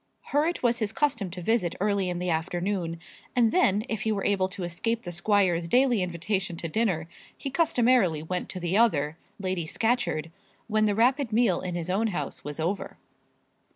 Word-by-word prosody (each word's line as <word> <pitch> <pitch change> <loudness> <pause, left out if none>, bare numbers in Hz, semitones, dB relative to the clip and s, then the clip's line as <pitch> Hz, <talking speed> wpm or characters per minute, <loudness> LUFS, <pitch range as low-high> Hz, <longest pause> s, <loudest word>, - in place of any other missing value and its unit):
Her 295 +3 +3
it 345 - -3
was 240 -1 +2
his 215 -2 0
custom 230 -6 0
to 180 0 -7
visit 210 -4 +1
early 200 -2 +1
in 175 - -2
the 180 0 -1
afternoon; 175 +1 -2 0.4
and 235 -3 +4
then, 210 - +3
if 220 -2 -3
he 220 -1 0
were 200 -2 -1
able 190 -2 +2
to 185 0 -6
escape 225 +7 -2
the 175 - -5
squire's 175 -2 +2
daily 245 +1 +3
invitation 180 +1 -2
to 165 - -4
dinner, 175 -4 0 0.3
he 275 - -5
customarily 245 - +3
went 180 +2 -3
to 185 - -5
the 175 +1 -1
other, 160 -9 +2 0.2
Lady 185 -4 -2
Scatcherd, 220 -8 0 0.4
when 215 -1 +2
the 205 -1 +1
rapid 250 +2 +2
meal 220 -5 +3
in 180 -1 -4
his 175 +1 -2
own 215 +4 +1
house 160 -9 -4
was 145 +2 -6
over. 175 +5 -2
195 Hz, 190 wpm, -27 LUFS, 175-230 Hz, 0.4 s, and